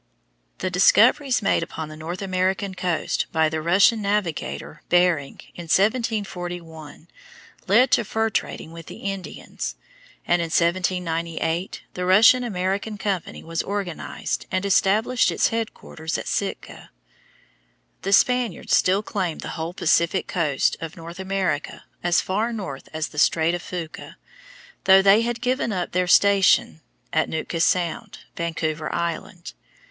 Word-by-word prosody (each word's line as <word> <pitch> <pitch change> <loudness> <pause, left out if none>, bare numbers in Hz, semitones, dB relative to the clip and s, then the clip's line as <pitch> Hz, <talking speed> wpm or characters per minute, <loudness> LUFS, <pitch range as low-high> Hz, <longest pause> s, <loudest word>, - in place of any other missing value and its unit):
The 185 - -3
discoveries 235 - +4
made - - +2
upon 160 -2 -6
the 155 - -9
North 165 +5 -6
American 190 +1 -1
coast 180 -4 -1
by 160 -1 +2
the 160 0 -3
Russian 195 +7 +4
navigator, 175 - -3
Bering, 175 -5 +2
in 175 - -8
1741, 175 - -2 0.6
led 245 +7 +4
to 245 - +4
fur 220 +1 -1
trading 160 - -3
with 165 -1 -11
the - - -9
Indians; 195 -2 -5 0.5
and 175 0 +2
in 170 - -2
1798 170 0 -1
the 180 - -4
Russian 220 +6 +6
American 200 0 -2
company 190 -3 -3
was 165 0 -2
organized 195 -4 -4
and 185 +1 -1
established 210 +5 +3
its - - +2
headquarters 215 -8 -4
at - - -6
Sitka. - - -4 1.1
The 195 - -3
Spaniards 250 +3 +2
still 195 +3 +2
claimed 185 -6 -3
the - - -6
whole 165 +2 -5
Pacific 170 +2 +2
coast 155 -7 0
of 165 0 -7
North 170 +2 -9
America 190 -6 -2 0.2
as 175 -1 +2
far 215 +5 -1
north 190 -12 -6
as 155 0 -3
the 150 - -5
Strait 160 +2 +3
of 175 - -3
Fuca, 170 -4 -7 0.7
though 190 0 +7
they 200 +3 +6
had 235 0 -2
given 250 -1 0
up 180 -3 -3
their 180 0 0
station 195 -4 +4 0.3
at 160 - +1
Nootka 160 +1 -3
Sound, 185 +6 0 0.2
Vancouver 160 -2 -3
Island. 170 +1 -4
180 Hz, 135 wpm, -23 LUFS, 165-200 Hz, 1.1 s, though